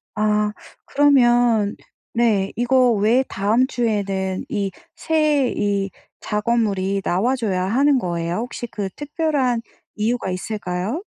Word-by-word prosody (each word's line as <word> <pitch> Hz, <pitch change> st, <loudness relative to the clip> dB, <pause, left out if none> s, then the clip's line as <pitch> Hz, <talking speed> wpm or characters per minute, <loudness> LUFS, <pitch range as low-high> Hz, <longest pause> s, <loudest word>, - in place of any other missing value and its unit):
아. 210 Hz, 0 st, +1 dB, 0.3 s
그러면 240 Hz, -7 st, +3 dB, 0.4 s
네 220 Hz, -5 st, +2 dB
이거 250 Hz, 0 st, +3 dB
왜 225 Hz, +5 st, +3 dB
다음 215 Hz, +6 st, +2 dB
주에는 200 Hz, -6 st, -1 dB
이 200 Hz, -2 st, -2 dB, 0.2 s
새 305 Hz, -5 st, +1 dB
이 200 Hz, -1 st, 0 dB, 0.3 s
작업물이 210 Hz, -3 st, 0 dB
나와줘야 205 Hz, -1 st, 0 dB
하는 270 Hz, +7 st, +3 dB
거예요? 170 Hz, -4 st, -2 dB
혹시 240 Hz, +1 st, -5 dB
그 205 Hz, -4 st, -4 dB
특별한 290 Hz, -5 st, 0 dB, 0.3 s
이유가 220 Hz, 0 st, -1 dB
있을까요? 185 Hz, -, -3 dB
220 Hz, 225 characters per minute, -21 LUFS, 195-250 Hz, 0.4 s, 그러면